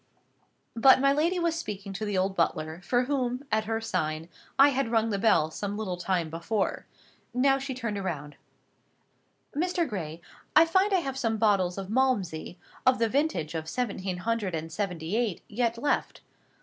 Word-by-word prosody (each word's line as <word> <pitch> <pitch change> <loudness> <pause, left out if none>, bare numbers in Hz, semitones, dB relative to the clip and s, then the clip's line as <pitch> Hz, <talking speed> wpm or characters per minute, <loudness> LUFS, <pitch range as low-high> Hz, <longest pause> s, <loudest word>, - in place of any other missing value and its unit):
But 260 +3 +7
my 275 +1 +4
lady 330 +5 +1
was 340 -2 +1
speaking 200 - -5
to 205 +3 -3
the 205 -2 -1
old 190 +1 +1
butler, 160 -1 -1
for 245 +7 +1
whom, 255 -1 -1
at 215 0 +1
her 225 +1 -1
sign, 160 -7 -2 0.3
I 275 +1 +8
had 275 -3 0
rung 225 -1 +2
the 200 - -1
bell 165 -8 +3
some 205 +4 -4
little 200 -4 -2
time 175 -2 -1
before. 190 +5 -2 0.5
Now 270 +2 +4
she 270 -1 -4
turned 220 -5 -3
round. 150 -5 -4 1.2
"Mr. 345 +1 0
Gray, 165 - -5 0.4
I 325 - +8
find 375 +5 +2
I 375 -2 +3
have 270 -3 -4
some 225 -2 0
bottles 200 -5 +2
of 195 -1 -5
Malmsey, 205 -10 0 0.3
of 255 0 +4
the 230 -1 +1
vintage 215 - 0
of 160 -1 -4
seventeen 195 -6 -2
hundred 210 -2 -1
and 160 0 -5
seventy 180 -1 -3
eight, 230 -6 -1
yet 230 +1 0
left. 285 +5 -1
220 Hz, 175 wpm, -28 LUFS, 180-260 Hz, 1.2 s, I